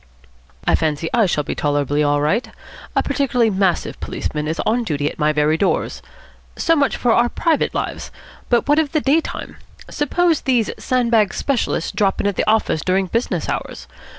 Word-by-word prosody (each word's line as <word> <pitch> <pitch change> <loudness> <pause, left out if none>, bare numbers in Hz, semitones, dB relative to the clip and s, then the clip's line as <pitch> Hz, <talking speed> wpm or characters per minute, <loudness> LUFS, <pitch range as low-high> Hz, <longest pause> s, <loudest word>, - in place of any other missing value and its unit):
"I - - +2
fancy 160 0 0
I 230 -4 +4
shall 150 -4 0
be - - -3
tolerably 145 0 0
all 145 0 +2
right. 200 - 0 0.5
A - - +2
particularly 250 -5 +1
massive 190 -2 0
policeman 150 0 -4
is 160 +2 -3
on 235 +2 +1
duty 145 -8 -1
at - - -15
my 150 0 +3
very 150 +1 +2
doors. 195 - -1 0.5
So 330 - +2
much 280 -3 +1
for 240 -2 +2
our 240 +1 +3
private 325 +2 0
lives. - - -3 0.4
But 240 +1 +2
what 295 +2 +4
of 300 -3 -1
the 310 - +2
day 290 +5 +3
time? - - -7 0.3
Suppose 330 +2 +1
these 245 -5 +1
sandbag 235 -5 +1
specialists 250 - -1
drop 195 -2 0
in - - -1
at 205 -1 0
the - - 0
office 215 -7 +1
during 190 +1 +1
business 230 +7 -2
hours. - - -4
215 Hz, 180 wpm, -20 LUFS, 155-255 Hz, 0.5 s, I